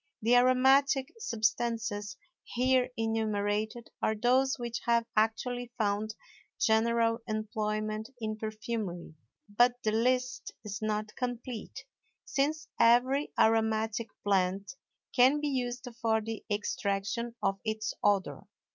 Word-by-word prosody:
The 235 +2 +5
aromatic 265 +2 +4
substances 225 - -1 0.3
here 255 0 +2
enumerated 220 0 -1
are 220 - +1
those 255 +4 +2
which 240 -1 -4
have 235 -1 +3
actually 235 +3 0
found 215 0 -1 0.4
general 230 +1 +3
employment 215 0 -2
in 215 -1 -3
perfumery; 215 -5 -4 0.3
but 240 +4 +3
the 215 - +2
list 250 +3 0
is 205 0 -5
not 215 0 -2
complete, 245 -2 -5 0.4
since 300 +3 -1
every 245 +5 +4
aromatic 220 0 +2 0.2
plant 195 +2 +1 0.4
can 260 +4 +5
be 295 0 -1
used 250 -1 -3
for 225 -1 +2
the 225 0 -6
extraction 210 +3 -2
of 195 0 +1
its 215 -1 -2
odor. 200 -2 +1
225 Hz, 110 wpm, -30 LUFS, 215-245 Hz, 0.4 s, The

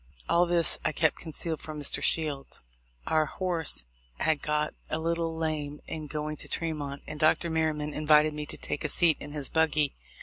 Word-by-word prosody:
All 175 +1 +3
this 170 -2 +4
I 155 - 0
kept 160 +1 +2
concealed 160 0 -3
from 155 -1 -7
Mr. 145 - 0
Shields. 145 - 0 0.4
Our 155 -1 +2
horse 170 - +1 0.4
had 155 -2 +2
got 150 0 0 0.2
a - - -1
little 165 0 -1
lame 150 -2 -2
in 155 -2 -6
going 150 0 -4
to - - -6
Tremont, 145 -4 -3
and 150 - -7
Dr. 160 +2 +3
Merryman 155 -2 -1
invited 150 0 +4
me 150 0 -5
to - - -3
take - - -4
a 155 - 0
seat 165 +1 +6
in 145 0 -8
his 145 -3 -3
buggy. 155 -3 +2
155 Hz, 180 wpm, -28 LUFS, 150-160 Hz, 0.4 s, seat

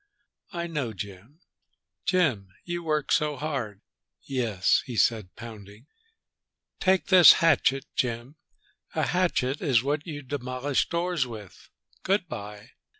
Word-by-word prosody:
"I 170 -1 -3
know 150 -9 -3
Jim. 100 - -9 0.6
Jim, 120 - +1
you 175 0 -3
work 155 -3 -1
so 150 -2 +2
hard!" 130 -9 -4 0.4
"Yes!" 115 -8 +1
he 120 -3 -5
said, 105 -2 +1
pounding. 110 -1 -11 0.9
"Take 190 -2 +2
this 185 -3 +10
hatchet, 135 -5 +2
Jim. 120 +3 -2 0.6
A - - +1
hatchet 155 -7 0
is 130 -7 +3
what 145 +4 -2
you 145 -3 -6
demolish 130 0 -2
doors 170 -5 0
with! 110 -5 -11 0.3
Good 190 -1 0
by." 105 -4 -8
135 Hz, 120 wpm, -27 LUFS, 110-160 Hz, 0.9 s, this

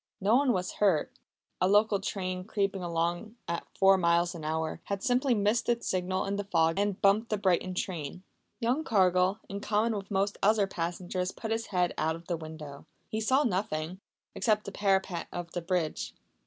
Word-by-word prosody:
No 205 +4 +3
one 270 0 +4
was 185 -4 -1
hurt. 190 -7 +3 0.5
A 185 - +4
local 205 +1 +4
train, 185 -2 -3
creeping 195 -1 -1
along 175 +5 -2
at 170 0 -3
four 195 0 +6
miles 170 0 +2
an 165 -3 -8
hour, 160 +1 -2
had 200 -1 -3
simply 250 0 +2
missed 210 +4 +1
its 235 0 0
signal 185 0 0
in 200 +1 -2
the 205 - -2
fog 165 -3 +2
and 205 -1 0
bumped 205 +3 +3
the 215 - 0
Brighton 185 -1 +1
train. 180 -2 -4 0.4
Young 255 +6 +1
Cargill, 185 - +3
in 200 - -5
common 215 +2 +1
with 195 -1 -5
most 200 0 0
other 210 0 +4
passengers 180 0 -3
put 225 - -6
his 225 0 -1
head 180 -2 +1
out 160 +1 +1
of 165 +1 -12
the 175 - -1
window. 155 -2 -9 0.2
He 220 - -2
saw 260 +6 +3
nothing 185 - -2 0.3
except 215 -2 +1
the 200 - -5
parapet 190 -3 0
of 175 -1 -5
the 175 - -3
bridge. 170 -2 -2
190 Hz, 185 wpm, -29 LUFS, 175-210 Hz, 0.5 s, four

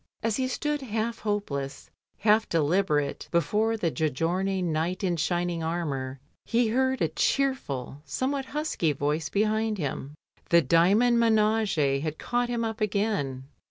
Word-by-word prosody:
As 225 -2 +1
he 260 -1 0
stood 295 +3 -2
half 230 -1 -2
hopeless, 145 -11 -3 0.3
half 215 +1 +3
deliberate, 155 -3 +1
before 210 +7 +1
the 170 -6 0
Giorgione 175 +6 0
knight 170 +3 -1
in 180 -2 +1
shining 175 +1 -1
armour 140 -6 -3 0.2
he 235 -1 +1
heard 260 +1 +1
a - - +3
cheerful, 155 - -1
some 260 - -2
what 275 -2 -2
husky 295 - -1
voice 150 +3 -1
behind 215 +1 +1
him: 145 -2 -4 0.3
The 170 -1 +5
Dymond 200 - +4
minage 215 -11 +2
had 155 0 -3
caught 245 0 -1
him 235 -1 -1
up 225 0 -4
again. 200 -11 -1
190 Hz, 140 wpm, -27 LUFS, 155-225 Hz, 0.3 s, The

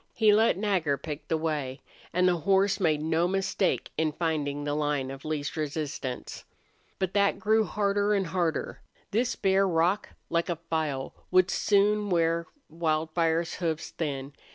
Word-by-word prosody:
He 215 -2 +5
let 220 -2 +4
Nagger 185 -9 +1
pick 150 +1 -7
the 160 - +1
way, 150 -4 -2 0.3
and 180 +1 +3
the 175 -1 +3
horse 195 +4 +2
made 155 -5 +1
no 160 +2 +2
mistake 195 0 0
in 160 -1 +2
finding 150 -3 -1
the 145 0 -1
line 145 -3 -1
of 135 0 -9
least 150 -2 -3
resistance. 145 -4 -4 0.5
But 190 -1 -2
that 200 -1 +3
grew 220 0 +2
harder 205 0 +1
and 195 -1 +1
harder. 165 -2 -2 0.3
This 235 +4 +1
bare 195 0 +3
rock, 180 +4 +1 0.2
like 170 +1 +1
a 175 - 0
file, 155 -5 -3 0.2
would 185 0 +4
soon 205 0 +2
wear 165 -1 +1 0.2
Wildfire's 160 +1 0
hoofs 160 -3 -2
thin. 140 -3 -4
165 Hz, 155 wpm, -28 LUFS, 155-195 Hz, 0.5 s, He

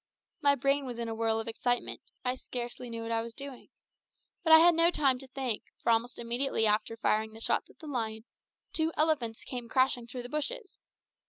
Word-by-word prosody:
My 285 -1 +5
brain 275 +1 +1
was 245 -2 -5
in 235 -1 -3
a 225 - -3
whirl 225 0 +1
of 225 - -5
excitement; 245 +2 -1 0.2
I 250 - +2
scarce 245 -1 -6
knew 230 -2 -6
what 230 - -4
I 225 0 +1
was 230 0 -7
doing. 275 -2 -8 0.7
But 325 - +2
I 320 - +12
had 340 +2 +7
no 335 +1 +5
time 275 -7 +2
to 270 - -5
think, 255 -4 -2 0.2
for - - +3
almost 230 +2 +1
immediately 235 0 0
after 215 +2 +1
firing 220 0 +1
the 220 - -10
shots - - 0
at - - -20
the 320 - -12
lion, 225 -6 -3 0.5
two 320 0 +2
elephants 290 -8 +1
came 245 -2 -6
crashing 255 -1 +2
through 245 +1 -6
the - - -6
bushes. 375 - -4
245 Hz, 205 wpm, -30 LUFS, 230-280 Hz, 0.7 s, I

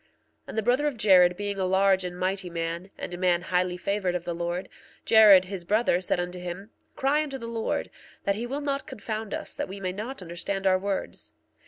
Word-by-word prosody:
1:34 - - -37 0.4
And - - -7
the 220 - +1
brother 255 +7 +2
of 280 -5 -3
Jared 180 -4 +5
being 205 -1 -3
a 190 - +1
large 190 0 +3
and 180 0 -5
mighty 185 0 -2
man, 170 +2 -4
and - - -6
a 175 - -6
man 175 -1 +2
highly 180 0 0
favored 190 -1 -1
of 175 - -2
the 175 - -3
Lord, 175 +2 -3 0.4
Jared, 210 -4 +8
his 185 -1 -6
brother, 205 -1 +2
said 180 - 0
unto 180 +1 -4
him: 180 +4 -7 0.2
Cry 280 +3 +2
unto 280 -3 -4
the 230 - -8
Lord, 230 -1 -2 0.3
that 200 - +2
he 230 +4 -4
will 275 +4 -3
not 275 -1 -2
confound 215 0 -5
us - - -4
that - - -3
we 195 +1 -7
may 185 -1 -2
not 215 +3 -6
understand 180 +3 -4
our 185 -1 +4
words. 195 0 -4
190 Hz, 220 wpm, -27 LUFS, 180-220 Hz, 0.4 s, Jared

